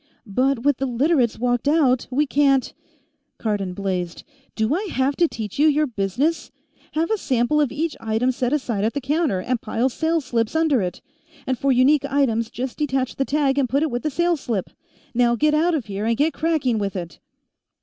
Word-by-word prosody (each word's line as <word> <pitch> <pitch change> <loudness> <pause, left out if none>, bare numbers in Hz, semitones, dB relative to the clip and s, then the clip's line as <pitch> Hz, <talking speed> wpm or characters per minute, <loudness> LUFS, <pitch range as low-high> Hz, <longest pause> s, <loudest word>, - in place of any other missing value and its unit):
"But 250 +4 0
with 285 -2 +3
the 270 - -1
Literates 255 0 +1
walked 245 +2 0
out, 285 -5 +3
we 280 +4 +1
can't 275 -2 +2 0.3
" 295 -2 -49
Cardon 200 -4 -2
blazed: 180 -3 -3 0.3
"Do 220 +4 +1
I 385 +6 -1
have 265 +2 0
to 340 - +4
teach 220 -4 -6
you 305 - +5
your 305 0 +3
business? 255 - -1 0.4
Have 325 +6 0
a 440 - +1
sample 260 +2 +1
of 285 - +1
each 310 +2 -2
item 225 +3 0
set 250 -1 -2
aside 245 -9 -1
at 220 - 0
the - - 0
counter, 285 - 0
and 240 +4 -2
pile 230 +4 0
sales 320 +2 -1
slips 230 +1 -1
under 315 -7 +3
it. 180 -1 -4 0.4
And 260 - 0
for 275 +2 +1
unique 265 +3 +4
items, 230 -5 +1
just 255 +3 -5
detach 265 -3 -1
the 270 - +1
tag 280 -1 +1
and 260 -3 +1
put 280 +4 +1
it 315 - -1
with 240 +1 -2
the 310 - -1
sales 340 +1 0
slip. 210 -6 -3 0.4
Now 240 0 +3
get 300 +5 +2
out 330 +3 +2
of 275 -7 -2
here, 205 0 -4
and 230 0 +1
get 310 +3 +2
cracking 305 -8 0
with 200 -1 -3
it!" 170 -4 -6
260 Hz, 205 wpm, -22 LUFS, 230-300 Hz, 0.4 s, you